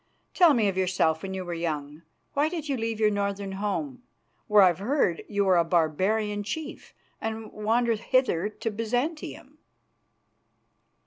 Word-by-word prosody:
Tell 345 -6 +6
me 220 -3 +2
of 190 -1 -1
yourself 175 -4 +1
when 190 0 -5
you 185 -1 -4
were 175 - -4
young. 155 -3 -4 0.3
Why 290 +2 +2
did 325 -3 -5
you 280 - 0
leave 225 -2 -3
your 215 -1 +3
northern 200 -1 -2
home, 210 +7 -3 0.5
where 210 -2 +6
I've 180 -2 +4
heard 205 - 0
you 205 -1 +1
were 185 -2 +4
a 170 - +4
barbarian 190 +6 +1
chief, 295 +10 -6 0.3
and 220 0 -4
wander 230 +3 +1
hither 220 -4 +1
to 220 +1 -4
Byzantium?" 245 +9 -3
210 Hz, 150 wpm, -27 LUFS, 185-235 Hz, 0.5 s, Tell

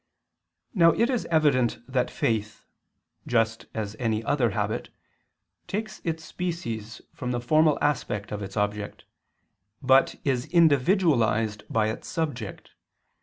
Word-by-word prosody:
Now 170 -5 +5
it 235 +8 +2
is 245 - -1
evident 145 -7 +2
that 130 -1 0
faith, 110 -2 -2 0.6
just 115 -1 0
as 110 -1 -3
any 110 -2 0
other 120 0 +2
habit, 105 +2 -2 0.8
takes 215 +2 -4
its 160 -1 -3
species 120 -11 -5
from 125 - -5
the 120 -1 -1
formal 155 +5 +3
aspect 105 -8 -1
of 105 0 -4
its 100 +1 -7
object, 105 0 -2 0.7
but 130 -1 +4
is 130 -3 0
individualized 135 - +3
by 110 -6 +1
its 110 - -6
subject. 145 - -4
125 Hz, 120 wpm, -26 LUFS, 110-155 Hz, 0.8 s, Now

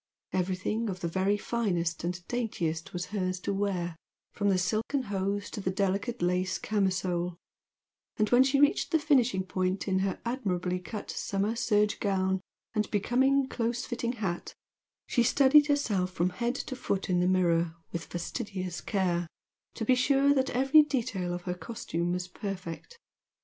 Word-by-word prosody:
Everything 190 +5 -1
of 185 -2 -5
the 170 - -1
very 190 +4 +1
finest 175 -9 -1
and 175 0 -4
daintiest 175 -10 -2
was 180 0 -3
hers 185 -3 -1
to 200 - -1
wear, 185 -4 -1 0.4
from 205 0 0
the 190 - +3
silken 215 +9 0
hose 200 -1 -2
to 210 - -5
the 185 - -1
delicate 200 +4 -1
lace 180 +1 +1
camisole, 185 -4 0 0.8
and 215 - +2
when 245 +1 +7
she 270 +1 +3
reached 290 0 +3
the 320 - +4
finishing 250 - +2
point 185 +1 -1
in 190 -1 +2
her 190 -1 -1
admirably 185 -7 -1
cut 205 +4 -6
summer 200 +3 -1
serge 210 -3 +2
gown 190 -2 +1 0.3
and 215 -1 0
becoming 260 +6 +2
close 235 -1 -2
fitting 240 -1 -2
hat, 195 -7 -4 0.5
she 245 - +1
studied 275 +5 +6
herself 215 -11 +1
from 180 0 0
head 235 +6 -1
to 265 - -4
foot 200 -6 -2
in 180 -1 +2
the 180 - +2
mirror 170 -3 +2 0.2
with 170 -1 -4
fastidious 185 -2 -4
care 175 -4 0 0.5
to 225 - -3
be 255 - +5
sure 275 +2 +4
that 265 -1 +1
every 270 +5 +6
detail 235 -11 -1
of 175 0 -4
her 180 - -2
costume 175 -2 -3
was 180 0 -2
perfect. 190 - -6
195 Hz, 160 wpm, -29 LUFS, 180-240 Hz, 0.8 s, when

